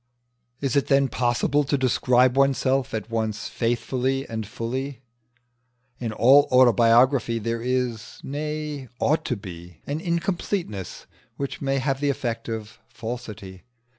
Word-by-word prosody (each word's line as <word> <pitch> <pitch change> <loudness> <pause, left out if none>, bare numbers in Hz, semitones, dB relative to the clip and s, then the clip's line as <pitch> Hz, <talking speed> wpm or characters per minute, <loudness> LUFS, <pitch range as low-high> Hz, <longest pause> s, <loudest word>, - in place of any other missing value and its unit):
Is 135 -3 -1
it 140 - +2
then 135 -1 +3
possible 125 +5 +1
to 140 +1 0
describe 125 -1 +3
oneself 135 -1 +2
at 110 +1 -5
once 110 -1 -2
faithfully 130 +3 -1
and 110 -2 -4
fully? 130 +4 -4 1.0
In 115 -3 -3
all 130 +6 +6
autobiography 120 0 +5
there 115 +1 -2
is, 125 -2 -2
nay, 150 -1 -4
ought 155 +5 +1
to 125 - 0
be, 90 -5 -10
an 145 +3 -3
incompleteness 170 - -3 0.3
which 140 -1 -4
may 135 -1 0
have 135 0 0
the 145 0 +1
effect 120 -4 -3
of 110 -1 -6
falsity. 105 -5 -7
125 Hz, 130 wpm, -24 LUFS, 115-140 Hz, 1.0 s, all